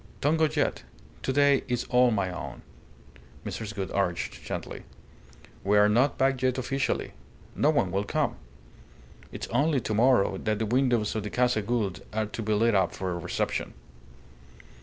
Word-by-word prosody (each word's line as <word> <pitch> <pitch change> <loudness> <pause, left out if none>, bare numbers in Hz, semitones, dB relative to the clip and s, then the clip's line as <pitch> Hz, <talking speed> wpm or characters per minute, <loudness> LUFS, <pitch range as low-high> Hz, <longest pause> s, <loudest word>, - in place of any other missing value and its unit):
"Don't 150 +3 +2
go 160 - +4
yet. 150 -2 0 0.4
To - - -1
day 140 0 +4
is 125 -1 -1
all 125 0 +5
my 100 -5 0
own," 90 - -7 0.8
Mrs. 105 -3 -5
Gould 95 -2 -4
urged, 90 -3 -2
gently. - - -5 0.8
"We 105 +2 +3
are 105 0 +6
not 125 +7 +2
back 135 -1 +1
yet 130 0 +1
officially. 135 +1 -1 0.4
No 150 - +3
one 140 - +2
will 100 +2 0
come. - - -1 0.9
It's - - -5
only 150 -1 +2
to 110 - -3
morrow 110 -4 +3
that 110 -1 -1
the 110 - -1
windows 120 -2 +1
of 110 - -1
the 105 - -5
Casa 125 -2 +1
Gould 105 -4 -2
are 110 0 0
to 110 +2 -6
be 110 0 -2
lit 115 +2 +3
up 95 -3 +2
for 95 -1 -3
a 85 - -3
reception." - - -2
115 Hz, 170 wpm, -27 LUFS, 100-130 Hz, 0.9 s, are